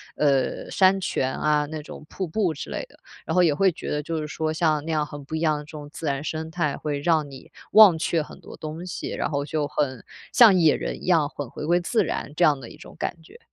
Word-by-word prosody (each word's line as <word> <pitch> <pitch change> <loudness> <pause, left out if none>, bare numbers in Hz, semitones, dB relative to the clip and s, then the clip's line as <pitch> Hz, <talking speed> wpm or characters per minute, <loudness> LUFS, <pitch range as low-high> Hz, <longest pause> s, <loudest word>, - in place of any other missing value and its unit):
呃， 140 -3 +1
山 190 0 +4
泉 130 -7 -1
啊、 150 -1 +2
那 155 0 -5
种 150 - -10
瀑 190 - -4
布 175 -1 0
之 - - -7
类 - - -3
的。 - - -21 0.3
然 - - -3
后 180 - +5
也 160 -4 +4
会 190 +6 +3
觉 - - -6
得 150 - -1
就 160 +2 -3
是 155 - -3
说， 155 +1 -2
像 155 -2 +1
那 165 - -4
样 155 -1 +1
很 145 -1 -9
不 155 - -5
一 160 - -2
样 155 -2 +2
的 - - -8
这 150 - -18
种 145 -1 -8
自 160 - -5
然 140 0 -1
生 160 0 -4
态 160 -4 -1
会 145 -2 -3
让 155 -2 +2
你 135 -1 -13 0.2
忘 210 -4 +9
却 165 0 0
很 - - -13
多 - - -11
东 155 +2 -6
西， 180 - -5
然 - - -2
后 145 -1 -2
就 150 -1 -1
很 140 -3 -2 0.3
像 225 -5 +8
野 160 -4 +5
人 - - -5
一 - - -6
样 165 -5 +3
很 145 -2 -6
回 150 - -6
归 175 +1 +3
自 200 +6 +1
然 145 - -4
这 - - +2
样 145 -3 +4
的 120 - -9
一 - - -13
种 - - -13
感 170 - -4
觉。 160 - -17
155 Hz, 285 characters per minute, -24 LUFS, 145-170 Hz, 0.3 s, 忘